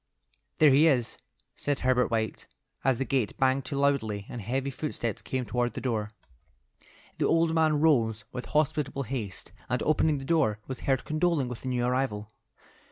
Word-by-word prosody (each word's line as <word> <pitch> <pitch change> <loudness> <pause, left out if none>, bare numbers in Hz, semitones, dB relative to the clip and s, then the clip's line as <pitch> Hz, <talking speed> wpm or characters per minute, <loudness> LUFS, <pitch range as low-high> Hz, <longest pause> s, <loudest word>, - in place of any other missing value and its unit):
"There 150 -2 +6
he 145 +5 +6
is," 125 -7 +1 0.4
said 145 -1 -2
Herbert 125 -1 +2
White, 110 -1 -2 0.4
as 130 -2 +2
the 135 - -1
gate 130 -7 -1
banged 130 0 +2
to 140 - -3
loudly 110 -8 +1
and 120 - -6
heavy 130 +6 -2
footsteps 130 -6 -3
came 130 -1 -3
toward 120 +1 -1
the - - -4
door. 110 -5 -2 1.1
The - - +2
old 165 0 +3
man 155 -2 +3
rose 115 -9 +2
with 125 - -5
hospitable 150 -2 0
haste, 110 -7 -5 0.2
and 125 0 0
opening 155 -1 +2
the 135 - -7
door, 140 -9 +2
was 130 - -6
heard 135 -2 0
condoling 155 -4 +1
with 125 - -7
the - - -6
new 125 -1 0
arrival. 125 -4 -1
130 Hz, 170 wpm, -28 LUFS, 120-145 Hz, 1.1 s, There